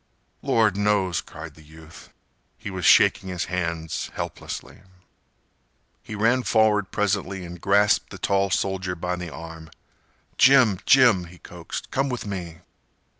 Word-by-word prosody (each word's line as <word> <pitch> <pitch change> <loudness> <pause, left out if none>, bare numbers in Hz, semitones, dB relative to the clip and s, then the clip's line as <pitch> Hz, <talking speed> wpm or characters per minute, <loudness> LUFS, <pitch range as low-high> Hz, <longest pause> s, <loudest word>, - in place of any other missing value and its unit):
"Lord 110 -4 +2
knows!" 100 -5 +1
cried 80 0 -10
the 80 - -18
youth. 80 +1 -15 0.5
He 100 - -7
was 95 -1 -4
shaking 95 - +5
his 90 -1 -3
hands 85 -3 -3
helplessly. - - -7 1.2
He 105 - -8
ran 115 +5 +2
forward 110 -4 +2
presently 100 -2 -2
and 85 0 -10
grasped 100 +1 +2
the - - -9
tall 100 0 0
soldier 95 -1 -2
by 90 +1 -3
the 90 -1 -6
arm. 80 +2 -10 0.7
"Jim! 130 -8 +5
Jim!" 120 -9 +5
he 85 +1 -14
coaxed, 85 0 -9
"come 135 +1 0
with 125 -3 -4
me." 90 -5 -6
95 Hz, 135 wpm, -24 LUFS, 85-105 Hz, 1.2 s, shaking